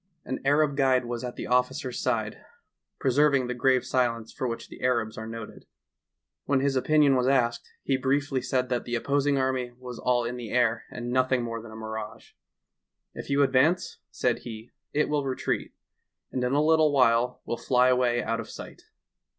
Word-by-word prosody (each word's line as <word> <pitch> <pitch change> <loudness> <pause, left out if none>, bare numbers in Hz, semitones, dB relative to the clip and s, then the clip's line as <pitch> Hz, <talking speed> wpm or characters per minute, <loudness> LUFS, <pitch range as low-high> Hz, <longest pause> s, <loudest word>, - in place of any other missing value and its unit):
An 130 - -3
Arab 145 +1 +3
guide 130 -2 +3
was 120 0 -4
at 125 -1 -5
the - - -5
officer's 125 +1 0
side, - - -1 0.6
preserv 140 +2 +3
ing 130 -2 +1
the 125 - -3
grave 130 +1 +2
silence 115 -3 -1
for 130 - -3
which 115 -1 -5
the - - -13
Arabs 120 -4 0
are 110 0 -6
noted. 115 -1 -9 0.8
When 140 -2 +2
his 140 0 0
opinion 145 +1 +4
was 125 0 +1
asked, 120 -3 +1
he 135 - +1
briefly 135 0 0
said 125 -1 -1
that 125 -1 -1
the 120 - -2
opposing 140 +3 +1
army 130 -2 -1
was 125 -1 -8
all 125 -1 +1
in 120 +1 -4
the 120 -3 -7
air 115 -1 +1
and 120 0 -5
nothing 130 -1 +2
more 115 -1 -4
than 115 -1 -11
a - - -10
mirage. 110 -1 -7 0.8
"If - - -8
you 140 0 +3
advance," 140 +7 +2
said - - 0
he, 110 -1 -9 0.2
"it 150 +1 +1
will 150 -1 0
retreat, 130 -1 -2 0.6
and 125 - -2
in 125 +1 0
a 145 +1 +3
little 160 -1 +4
while 125 -2 +2
will 120 - -3
fly 125 0 +3
away 125 -1 +2
out 115 +1 -1
of 115 - -6
sight." - - -10
125 Hz, 190 wpm, -27 LUFS, 120-135 Hz, 0.8 s, opinion